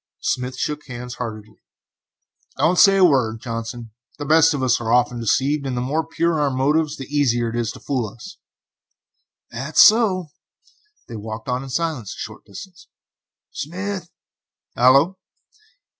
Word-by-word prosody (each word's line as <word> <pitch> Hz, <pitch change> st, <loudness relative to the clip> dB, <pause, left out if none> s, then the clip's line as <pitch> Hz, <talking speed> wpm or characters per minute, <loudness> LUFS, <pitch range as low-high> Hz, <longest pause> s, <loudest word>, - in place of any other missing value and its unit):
Smith 125 Hz, 0 st, -2 dB
shook 150 Hz, +2 st, -3 dB
hands 125 Hz, -1 st, -7 dB
heartily. 110 Hz, -2 st, -7 dB, 1.0 s
"Don't 165 Hz, +6 st, +2 dB
say 195 Hz, -1 st, +7 dB
a 190 Hz, -, +6 dB
word, 120 Hz, -8 st, +2 dB
Johnson; 115 Hz, -1 st, -6 dB, 0.3 s
the 145 Hz, -, -5 dB
best 160 Hz, +2 st, +5 dB
of 135 Hz, -, -3 dB
us 125 Hz, -2 st, +2 dB
are 115 Hz, -1 st, -2 dB
often 125 Hz, 0 st, +2 dB
deceived, 135 Hz, +6 st, +1 dB
and 125 Hz, -2 st, -3 dB
the -, -, 0 dB
more 145 Hz, +6 st, -1 dB
pure 165 Hz, 0 st, 0 dB
our 145 Hz, -1 st, +2 dB
motives 145 Hz, +4 st, 0 dB
are -, -, -5 dB
the 145 Hz, +3 st, -8 dB
easier 120 Hz, -5 st, +1 dB
it -, -, -6 dB
is 120 Hz, -2 st, -1 dB
to -, -, -12 dB
fool 130 Hz, -6 st, -2 dB
us." 110 Hz, +3 st, -12 dB, 1.1 s
"That's 135 Hz, +7 st, +4 dB
so." 200 Hz, -7 st, +3 dB, 0.8 s
They 115 Hz, -, -7 dB
walked 110 Hz, +2 st, -7 dB
on 125 Hz, 0 st, -1 dB
in 135 Hz, -, -8 dB
silence 150 Hz, -, -3 dB
for -, -, -16 dB
a -, -, -11 dB
short -, -, -20 dB
distance. 185 Hz, -, -12 dB, 0.6 s
"Smith." 185 Hz, +3 st, -5 dB, 0.7 s
"Hallo." 140 Hz, +10 st, +4 dB
135 Hz, 160 wpm, -21 LUFS, 120-160 Hz, 1.1 s, say